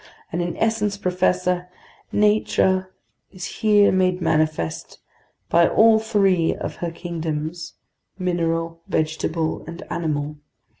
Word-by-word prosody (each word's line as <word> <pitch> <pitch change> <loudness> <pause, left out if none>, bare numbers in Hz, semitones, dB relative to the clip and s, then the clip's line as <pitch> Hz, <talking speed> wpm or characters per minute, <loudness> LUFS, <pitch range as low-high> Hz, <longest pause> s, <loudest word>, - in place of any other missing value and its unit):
And 175 - -1
in 175 -1 -3
essence, 210 -2 0
professor, 180 -1 0 0.4
nature 190 -3 +2 0.4
is 185 -2 -7
here 210 -2 +3
made 185 -1 +2
manifest 155 - -1 0.5
by 170 0 +4
all 220 0 +5
three 195 -6 +2
of - - -6
her 170 - -3
kingdoms, 165 -1 -5 0.4
mineral, 165 -2 -1
vegetable, 160 +1 -1
and 170 +1 -8
animal. 150 -2 -2
175 Hz, 105 wpm, -22 LUFS, 165-190 Hz, 0.5 s, all